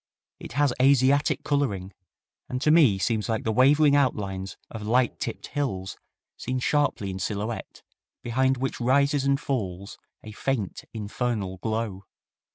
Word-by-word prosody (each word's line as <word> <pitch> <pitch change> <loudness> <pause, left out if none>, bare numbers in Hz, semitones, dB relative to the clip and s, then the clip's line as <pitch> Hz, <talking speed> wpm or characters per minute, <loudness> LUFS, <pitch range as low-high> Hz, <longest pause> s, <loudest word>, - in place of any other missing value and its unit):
It - - -9
has 145 -1 +2
Asiatic 140 +2 +3
coloring, 100 -10 -1 0.6
and 125 - -2
to 150 - +4
me 145 -12 +5
seems 110 +3 -1
like 110 -1 -1
the 110 - 0
wavering 140 +5 +5
outlines 100 -9 -1
of 110 - -7
light 120 +4 +1
tipped - - -4
hills 95 -11 -3 0.4
seen 130 - -3
sharply 130 -7 0
en 95 - -6
silhouette, 105 +3 -4 0.4
behind 130 +2 +1
which 130 0 -3
rises 140 +3 +2
and 140 0 +2
falls 100 -9 -4 0.2
a 110 - -9
faint, 110 -3 -3
infernal 105 -3 -3
glow. 110 -2 -3
120 Hz, 140 wpm, -26 LUFS, 100-140 Hz, 0.6 s, me